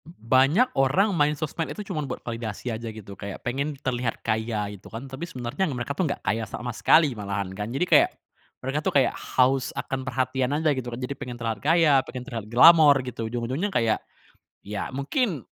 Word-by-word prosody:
B -, -, -13 dB, 0.2 s
banyak 145 Hz, -, +4 dB
orang 190 Hz, +10 st, +3 dB
main 150 Hz, -2 st, +2 dB
sosmed 155 Hz, +2 st, -3 dB
itu 210 Hz, -, -6 dB
cuman 150 Hz, -4 st, -3 dB
buat 125 Hz, -, -6 dB
validasi 115 Hz, 0 st, -4 dB
aja 115 Hz, +1 st, -5 dB
gitu 110 Hz, -3 st, -9 dB
kayak 100 Hz, 0 st, -8 dB
pengen 140 Hz, +4 st, -2 dB
terlihat 125 Hz, -3 st, -2 dB
kaya 110 Hz, -1 st, -1 dB
itu 100 Hz, -, -12 dB
kan? 115 Hz, +4 st, -7 dB
Tapi 135 Hz, +6 st, -7 dB
sebenernya 130 Hz, +7 st, -2 dB
mereka 125 Hz, 0 st, -3 dB
tuh 160 Hz, +1 st, -1 dB
nggak -, -, -5 dB
kaya 115 Hz, +1 st, 0 dB
sama 120 Hz, -1 st, -5 dB
sekali 155 Hz, +3 st, +4 dB
malahan 100 Hz, -3 st, -4 dB
kan 105 Hz, +2 st, -5 dB
jadi, 135 Hz, +8 st, 0 dB
kayak 335 Hz, -, +5 dB, 0.6 s
mereka 135 Hz, +3 st, -1 dB
tuh -, -, +1 dB
kayak 135 Hz, -, +3 dB
haus 130 Hz, 0 st, +1 dB
akan 135 Hz, 0 st, -3 dB
perhatian 130 Hz, 0 st, -1 dB
aja 160 Hz, 0 st, +2 dB
gitu 130 Hz, -3 st, -4 dB
kan 120 Hz, -, -6 dB
jadi 125 Hz, +2 st, -4 dB
pengen 125 Hz, -1 st, -7 dB
terlihat 115 Hz, -3 st, -3 dB
kaya 160 Hz, 0 st, +4 dB
pengen 125 Hz, -1 st, -7 dB
terlihat 115 Hz, -7 st, -5 dB
glamor 150 Hz, +3 st, +8 dB
gitu 115 Hz, -3 st, -4 dB
ujung-ujungnya 125 Hz, -, -2 dB
kayak, 115 Hz, -, +1 dB, 0.6 s
ya 100 Hz, 0 st, -4 dB
mungkin, 160 Hz, -, -1 dB
130 Hz, 195 wpm, -25 LUFS, 115-150 Hz, 0.6 s, glamor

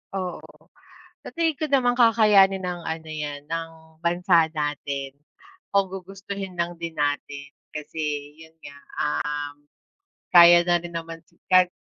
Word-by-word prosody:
Oo, 185 Hz, -2 st, -3 dB, 0.8 s
sa -, -, -10 dB
tingin 325 Hz, -3 st, 0 dB
ko 310 Hz, -, 0 dB
naman 255 Hz, -3 st, +2 dB
kakayanin 210 Hz, -5 st, +5 dB
ng 180 Hz, -1 st, -4 dB
ano 160 Hz, 0 st, -5 dB
'yan, 145 Hz, -2 st, -5 dB
ng 165 Hz, +1 st, -4 dB, 0.3 s
bansa 170 Hz, -1 st, +3 dB
natin 140 Hz, -2 st, -3 dB, 0.6 s
kung 195 Hz, -2 st, +2 dB
gugustuhin 195 Hz, 0 st, -7 dB
lang 175 Hz, 0 st, -3 dB
din 170 Hz, -1 st, -5 dB
natin, 145 Hz, -1 st, -2 dB, 0.3 s
kasi 150 Hz, -1 st, -4 dB
yun 160 Hz, 0 st, -15 dB
nga, 145 Hz, -1 st, -11 dB, 0.3 s
um, 145 Hz, 0 st, -3 dB, 0.7 s
kaya 175 Hz, 0 st, +9 dB
na 175 Hz, 0 st, +3 dB
rin 170 Hz, 0 st, -9 dB
naman, 165 Hz, 0 st, -5 dB, 0.3 s
kahit 185 Hz, -1 st, +6 dB
170 Hz, 130 wpm, -24 LUFS, 150-190 Hz, 0.8 s, kaya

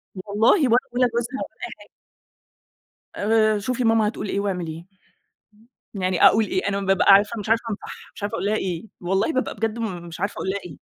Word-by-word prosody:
والله 205 Hz, +4 st, +1 dB, 0.2 s
ولا 235 Hz, +1 st, +5 dB, 0.2 s
ولا 250 Hz, 0 st, +3 dB
جوزها 235 Hz, +2 st, -3 dB
ولا -, -, -7 dB
أي -, -, -11 dB
حاجة. -, -, -16 dB, 1.3 s
آآ 215 Hz, 0 st, +2 dB
شوفي 250 Hz, +4 st, -2 dB
ماما 225 Hz, -2 st, +3 dB
هتقول 210 Hz, -1 st, -4 dB
إيه 200 Hz, -, -1 dB
واعمليه. 175 Hz, -4 st, -3 dB, 1.1 s
يعني 185 Hz, -3 st, +2 dB
أقول 220 Hz, +1 st, +6 dB
إيه؟ 185 Hz, 0 st, -2 dB
أنا 200 Hz, 0 st, -1 dB
بابقى 195 Hz, 0 st, +4 dB
عارفة 210 Hz, +3 st, +4 dB
مش 210 Hz, -, -6 dB
عارفة 225 Hz, +1 st, +3 dB
أنصحها، 210 Hz, -, -8 dB
مش -, -, -10 dB
عارفة 205 Hz, -, -3 dB
أقول -, -, -3 dB
لها 210 Hz, -, +1 dB
إيه، 185 Hz, -2 st, -3 dB, 0.2 s
والله 195 Hz, -, 0 dB
بابقى 260 Hz, -, -1 dB
بجد 225 Hz, +2 st, -2 dB
م 185 Hz, -7 st, -4 dB
مش 165 Hz, 0 st, -9 dB
عارفة 200 Hz, +3 st, -1 dB
أقول 190 Hz, -, -4 dB
لها 200 Hz, -, -1 dB
إيه. 165 Hz, -5 st, -10 dB
205 Hz, 200 wpm, -23 LUFS, 190-225 Hz, 1.3 s, أقول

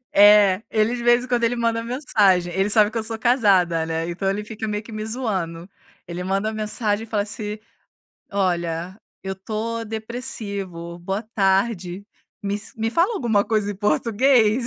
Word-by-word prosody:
É, 205 Hz, -1 st, +7 dB
ele, 220 Hz, +2 st, +1 dB
de 240 Hz, -, -5 dB
vez 240 Hz, +1 st, +4 dB
em -, -, -7 dB
quando, 240 Hz, -1 st, 0 dB
ele 240 Hz, +1 st, +2 dB
manda 230 Hz, -1 st, 0 dB
mensagem, 205 Hz, -, +2 dB
ele 195 Hz, +2 st, +1 dB
sabe 210 Hz, 0 st, +4 dB
que 235 Hz, -, -4 dB
eu -, -, -3 dB
sou 225 Hz, 0 st, -3 dB
casada, 200 Hz, -9 st, +3 dB
né. 165 Hz, +1 st, -2 dB
Então, 190 Hz, +3 st, -2 dB
ele 205 Hz, +2 st, -2 dB
fica 220 Hz, 0 st, -5 dB
meio 210 Hz, 0 st, -3 dB
que 225 Hz, -, -12 dB
me 215 Hz, 0 st, -4 dB
zoando. 190 Hz, -8 st, -3 dB, 0.4 s
Ele 175 Hz, +1 st, -5 dB
manda 195 Hz, +3 st, -1 dB
mensagem 215 Hz, 0 st, -1 dB
e -, -, -21 dB
fala 205 Hz, -2 st, 0 dB
assim: 210 Hz, 0 st, -4 dB, 0.7 s
"Olha, 175 Hz, -1 st, -1 dB, 0.2 s
eu 190 Hz, 0 st, -4 dB
tô 225 Hz, +4 st, -4 dB
depressivo. 200 Hz, -7 st, -4 dB
Boa 190 Hz, +4 st, -3 dB
tarde. 195 Hz, -1 st, +1 dB, 0.4 s
me 200 Hz, 0 st, -1 dB
ens 210 Hz, +6 st, -4 dB
me 225 Hz, 0 st, -1 dB
fala 345 Hz, -, +2 dB
alguma 225 Hz, -, +2 dB
coisa 210 Hz, -2 st, 0 dB
em -, -, -4 dB
português." 225 Hz, -, +2 dB
210 Hz, 175 wpm, -22 LUFS, 190-230 Hz, 0.7 s, É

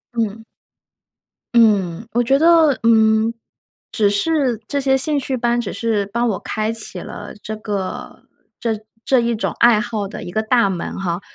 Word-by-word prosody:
嗯。 225 Hz, -1 st, -2 dB, 1.1 s
嗯， 210 Hz, -4 st, +3 dB
我 240 Hz, +1 st, +2 dB
觉 270 Hz, +4 st, +2 dB
得 325 Hz, -3 st, +5 dB
嗯， 220 Hz, -1 st, +4 dB, 0.6 s
只 210 Hz, -3 st, +2 dB
是 255 Hz, +2 st, +1 dB
这 280 Hz, -, -1 dB
些 265 Hz, -1 st, +2 dB
兴 290 Hz, +2 st, 0 dB
趣 265 Hz, -1 st, -2 dB
班 240 Hz, 0 st, +1 dB
只 215 Hz, -, -5 dB
是 225 Hz, -3 st, -1 dB
帮 235 Hz, +4 st, -1 dB
我 200 Hz, -, -2 dB
开 215 Hz, +1 st, -2 dB
启 225 Hz, -1 st, 0 dB
了 205 Hz, -, -8 dB
这 215 Hz, -, -5 dB
个 205 Hz, -3 st, -5 dB, 0.4 s
这 230 Hz, -, -1 dB, 0.3 s
这 265 Hz, -, +3 dB
一 235 Hz, 0 st, 0 dB
种 220 Hz, -, -2 dB
爱 235 Hz, -3 st, +5 dB
好 215 Hz, -3 st, -3 dB
的 -, -, -8 dB
一 175 Hz, -, -7 dB
个 215 Hz, -, 0 dB
大 230 Hz, 0 st, +2 dB
门 185 Hz, -1 st, -4 dB
哈。 175 Hz, -1 st, -2 dB
225 Hz, 180 characters per minute, -19 LUFS, 210-245 Hz, 1.1 s, 得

